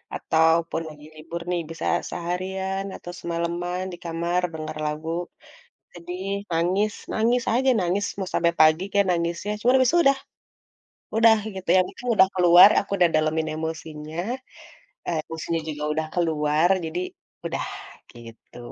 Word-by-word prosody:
ataupun 160 +1 +2
lagi 150 0 -13
libur 165 +2 -7
nih 175 - 0
bisa 165 - -6 0.2
seharian 190 +2 -3
atau 175 - -8
semaleman, 170 +2 -3
di - - -7
kamar, 170 +2 -1
denger 155 -1 -6
lagu, 155 +2 -3 0.8
sedih, 180 +2 -7 0.2
nangis, 185 +6 +1 0.2
nangis 235 +2 +2
aja 260 +2 +3
nangis, 185 +3 0
mau 190 -2 -3
sampai 170 0 +2
pagi 155 +3 +6
kek 200 -1 +3
nangisnya 170 +4 -1
cuman 250 +3 +3
habis 255 - +4
itu 345 - +4
udah, 275 0 +4 1.0
udah 225 -1 +7 0.2
gitu 190 -1 -8
ya 185 - +6
mungkin 245 - -10
udah 190 -1 +6
keluar, 180 +2 +8
aku 200 - -7
udah 175 -2 +4
dalemin 155 +1 +1
emosinya, 160 -1 -6 1.1
emosinya 165 0 -3
juga 150 -1 -5
udah 160 0 -1
keluar 160 -1 +1 0.2
jadi 165 +2 -3 0.5
udah, - - -2 0.5
gitu. 115 0 -14
170 Hz, 140 wpm, -24 LUFS, 160-190 Hz, 1.1 s, keluar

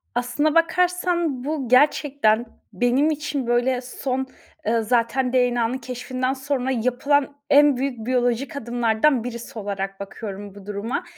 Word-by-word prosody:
Aslına 270 +6 0
bakarsan, 345 -4 +1
bu 285 -4 -3
gerçekten 255 -4 +3 0.3
benim 245 +9 +2
için, 295 -4 -3
böyle, 245 +1 +1
son, 260 +1 -3 0.4
ııı, 225 0 +2
zaten 245 +3 +1
DNA'nın 245 -1 +2
keşfinden 255 0 -3
sonra 265 -1 -2
yapılan 265 +4 +1
en 290 -2 +6
büyük 250 -4 -3
biyolojik 250 +3 0
adımlardan 240 +1 +1
birisi 235 -1 -7
olarak 195 -1 -4
bakıyorum 200 0 -7
bu 200 -2 -12
duruma. 210 +4 -3
250 Hz, 125 wpm, -23 LUFS, 230-280 Hz, 0.4 s, en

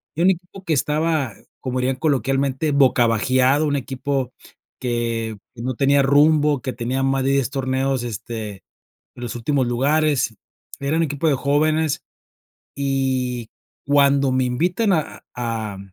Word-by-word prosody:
Y 165 - -2
un 185 - +5
equipo 185 +1 -4
que 165 - 0
estaba, 150 -3 0 0.3
como 130 -1 -3
dirían 130 +1 0
coloquialmente: 135 +1 0
"Boca 130 -4 +4
bajeado", 130 +6 +2
un 145 -1 0
equipo 135 -1 -2 0.5
que, 115 -3 -2 0.2
no 125 +2 -3
tenía 140 +2 +3
rumbo, 145 0 +4
que 130 - -3
tenía 125 +2 -2
más 135 0 +1
de 135 - +1
10 135 -3 +1
torneos, 135 -1 0
este, 110 -1 -5 0.6
en 125 - -11
los 120 - -4
últimos 130 +2 0
lugares. 135 -2 +1 0.4
Era 140 +3 0
un - - +3
equipo 150 0 0
de 145 - +3
jóvenes, 155 +2 +1 0.7
y 130 -4 -1 0.4
cuando 140 -1 +4
me 130 0 +2
invitan 175 - +1
a 160 -4 -2
a 115 -4 -3
a - - -10
135 Hz, 145 wpm, -21 LUFS, 125-145 Hz, 0.7 s, un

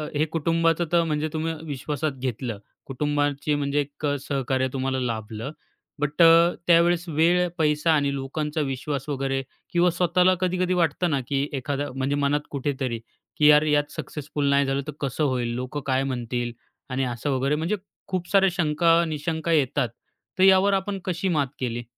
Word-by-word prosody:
हे 150 +2 +2
कुटुंबाचं 165 +1 +1
तर 170 -1 +4
म्हणजे 155 -1 -1
तुम्ही 160 +1 -1
विश्वासात 150 +2 -2
घेतलं 120 -3 -3 0.3
कुटुंबाची 145 +1 -1
म्हणजे 145 0 0
एक 145 +2 -7 0.2
सहकार्य 130 -1 0
तुम्हाला 130 0 -1
लाभलं. 115 +1 -4 0.5
बट 150 +3 0
अ, 165 +1 +7
त्यावेळेस 170 +1 +4
वेळ, 170 +3 +3
पैसा 150 0 +2
आणि 140 -2 +1
लोकांचा 150 +3 -3
विश्वास 135 +1 -3
वगैरे, 135 -1 -1 0.3
किंवा 175 +1 +4
स्वतःला 180 +1 +3
कधी 185 0 0
कधी 185 0 +1
वाटतं 175 0 +1
ना 140 - +1
की 140 0 0
एखादा, 140 +1 -3
म्हणजे 135 +1 0
मनात 145 +1 +1
कुठेतरी 130 -4 -2 0.4
की, 150 - +5
"यार! 150 0 +7
यात 145 -1 +1
सक्सेसफुल 150 -2 -3
नाही 140 0 +3
झालं 135 +1 0
तर - - -3
कसं 140 +2 -1
होईल? 125 -4 0
लोकं 130 +4 -4
काय 130 0 +2
म्हणतील?" 120 -2 -3 0.4
आणि 130 +1 -1
असं 120 +4 -3
वगैरे 135 +3 +1
म्हणजे 165 +7 -1 0.3
खूप 185 -2 -3
साऱ्या 195 -1 +5
शंका-निशंका 165 -1 +1
येतात; 140 -4 +2 0.5
तर 185 - +5
यावर 195 +1 +6
आपण 195 0 -1
कशी 180 +1 -1
मात 150 -5 +1
केली? 120 -2 -3
145 Hz, 160 wpm, -25 LUFS, 135-165 Hz, 0.5 s, अ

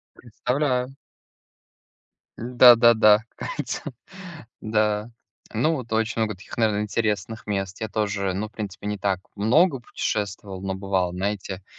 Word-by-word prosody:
Представляю. 125 +2 -2 1.4
Н-да, 120 +1 +7
да-да. 110 -3 +6 0.2
Ка - - -6
ица, - - -3 0.8
да. 110 0 0 0.4
Ну, 150 +9 +2
вот 125 -5 -7
очень 110 0 0
много 105 -2 -1
таких, 95 - -12
наверно, 105 -2 +2
интересных 105 0 -2
мест, 95 -1 -3
я 110 - -1
тоже, 100 -2 -1
ну, 105 +3 -3
в - - -35
принципе, 105 -2 -6
не 105 0 -2
так 95 -1 0 0.2
много 135 - +3
путешествовал, 100 -4 -4
но 95 0 -3
бывал, 95 -2 -1
знаете. 95 0 -3
105 Hz, 130 wpm, -24 LUFS, 100-115 Hz, 1.4 s, Н-да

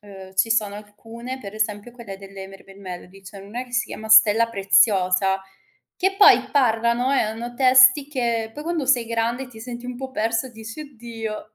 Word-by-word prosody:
uhm, 190 -2 -13
ci 210 +4 +1
sono 210 -3 0
alcune, 225 +5 -10
per 200 -5 -9
esempio 215 +1 -3
quelle 230 -6 -10
delle 195 0 -10
Mermaid 195 0 -15
Melody, 185 0 -10
c'è 195 +1 -12
n'una 225 +6 -7
che 245 - -19
si 240 - 0
chiama: 220 0 -9
"Stella 220 +1 +6
preziosa", 195 -2 +2 0.5
che 385 +1 0
poi 415 0 +5
parlano 235 -1 +1
e - - +2
hanno 230 +3 -4
testi 255 +2 +5
che 235 -5 -2
poi 295 - -8
quando 330 -3 -2
sei 250 -3 +2
grande 235 +3 -2
ti 225 - -14
senti 240 +1 -8
un 250 0 -6
po' 265 +1 -7
persa 230 +1 -2
e - - -15
dici: 225 +4 -10
"Oddio", 225 -6 -8
225 Hz, 185 wpm, -22 LUFS, 205-250 Hz, 0.5 s, Stella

